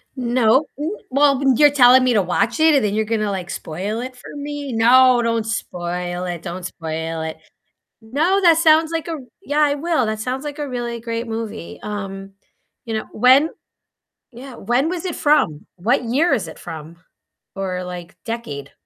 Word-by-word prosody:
Nope, 250 +2 +2
w 320 +8 -3
well, 280 0 +3 0.2
you're 295 -1 +6
telling 255 -2 +6
me 250 -1 +3
to 205 - +4
watch 230 - 0
it, 315 -1 +5
and 270 -6 +3
then 205 - -1
you're 220 0 +1
gonna, 215 -2 -1
like, 185 -1 -4
spoil 195 +9 -4
it 255 +1 -6
for 250 - -12
me. 290 -1 -5
No, 245 +2 +5
don't 230 -1 0
spoil 180 -3 -4
it, 175 -2 -4
don't 180 0 -6
spoil 160 -1 -4
it. 160 0 -5 0.7
No, 320 - +1
that 335 -2 +6
sounds 320 -1 +4
like 330 0 -3
a 335 - -4
r 315 - -4 0.2
yeah, 295 -2 -1
I 290 -1 +3
will. 300 -5 0
That 215 0 -2
sounds 255 +4 -3
like 295 0 -6
a 290 -2 -3
really 240 -2 -4
great 230 0 -4
movie, 215 - -6
um, 195 -2 -6 0.5
you 225 - -4
know, 220 - -2
when 260 +7 +5 0.8
yeah, 255 +2 -10
when 255 +6 0
was 355 0 -4
it 355 - -3
from? 290 - +1
What 240 +8 +1
year 280 +7 +2
is 235 - 0
it - - -11
from? 160 +1 -9 0.6
Or, 185 -2 -3
like, 180 0 -8
decade? 145 -12 -6
235 Hz, 185 wpm, -20 LUFS, 195-285 Hz, 0.8 s, you're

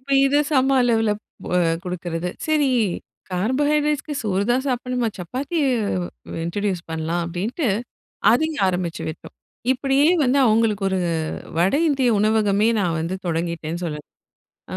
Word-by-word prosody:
இப்ப 270 +2 -13 0.2
இத 275 +1 +2
சம 270 -2 +3
அளவுல 225 -3 +2 0.5
அ - - +4 0.3
குடுக்கிறது. 175 -1 -3 0.2
சரி 305 -3 +2 0.6
கார்போஹைட்ரேட்ஸ்க்கு 290 - 0
சோறு 200 -2 0
தான் 260 +2 0
சாப்பிடணுமா! 250 -1 -1
சப்பாத்தி 260 - -3 0.7
வ் - - -5
இன்ட்ரோடியூஸ் 185 +1 -2
பண்லாம் 160 +2 -1
அப்பிடின்னுட்டு 205 - -2 0.6
அதையும் 310 0 +1
ஆரம்பிச்சு 180 -2 -2
விட்டோம். 155 - -9 0.4
இப்பிடியே 270 +3 +2 0.2
வந்து 260 +2 +3
அவுங்களுக்கு 215 -2 +2
ஒரு 190 - 0 0.6
வட 180 +6 +3
இந்திய 270 -4 +2
உணவகமே 210 0 +3
நான் 175 -4 0
வந்து 165 +3 -2
தொடங்கிட்டேன்னு 170 0 -2
சொல்ல 150 -2 -3 0.8
ஆ - - -3
215 Hz, 125 wpm, -22 LUFS, 180-265 Hz, 0.8 s, அ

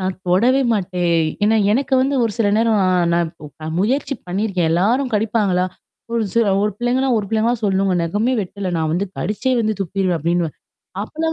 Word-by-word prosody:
நான் 185 0 -2
தொடவே 240 +10 +3
மாட்டேன். 180 -4 0 0.3
ஏன்னா 220 +1 +3 0.2
எனக்கு 270 +3 +1
வந்து 275 +2 0
ஒரு 225 - -1
சில 220 -3 +2
நேரம் 225 -2 +2 0.3
ந - - +3 0.4
நான் 160 +1 -4
முயற்சி 270 +7 0
பண்ணியிருக்கேன் 185 -2 -1
எல்லாரும் 235 +10 +1
கடிப்பாங்களா? 205 -4 +1 0.5
ஒரு 230 -1 +1 0.4
ஒரு 210 - +1
பிள்ளைங்கன்னா, 255 +2 +1
ஒரு 210 - -3
பிள்ளைங்களா 225 +2 +1
சொல்லுங்க. 195 -1 +1
நெகமே 205 +9 0
வெட்டல 190 0 -5
நான் 160 -1 0
வந்து 190 +4 0
கடுச்சே 215 +7 -1
வந்து 220 -1 +1
துப்பிருவேன் 185 -1 -1
அப்படின்னுவன். 170 0 -1 0.5
அப்டிலாம் 320 +8 -3
205 Hz, 160 wpm, -19 LUFS, 180-235 Hz, 0.5 s, தொடவே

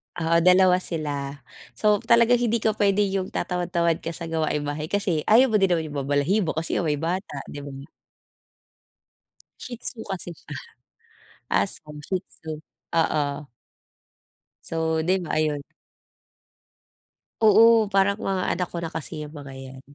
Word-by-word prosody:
Oo, 165 0 +2
2 180 +1 +5
sila. 145 -5 -4 0.3
So 210 -1 +3
talagang 235 +1 +4
hindi 235 -2 0
ka 220 - +3
puwede 205 -1 +2
yung 195 -1 -1
tatamad-tamad 170 -2 0
ka 165 0 -5
sa 165 0 -6
gawaing 155 -2 0
bahay 145 +2 -4
kasi 185 -6 -1
ayaw 240 +3 +6
mo 215 - +3
din 195 - +4
naman 165 -4 -1
'yung 145 - -5
mabalahibo 145 +7 +1
kasi 160 +1 -1
nga 170 - -1
may 150 - +1
bata, 170 +2 -3 0.2
'di 145 - -7
ba? 140 -1 -8 1.8
Shih 245 -1 -7
Tzu 235 - -7
kasi 185 -2 -3
siya, - - -11 1.1
aso - - +3 0.2
Shih 185 -1 -1
Tzu, 160 - -9 0.5
oo. 150 -2 +1 1.4
So 160 -1 -1
di 185 +1 +2
ba, 170 - -7
ayun. 150 -2 0 1.8
Oo, 220 0 +6
parang 195 0 +3
mga 195 -3 -2
anak 180 0 -2
ko - - -5
na 165 - -3
kasi 160 -1 -6
'yang 150 +1 -10
mga 140 -2 -9
'yan. 130 0 -10
170 Hz, 145 wpm, -24 LUFS, 155-200 Hz, 1.8 s, ayaw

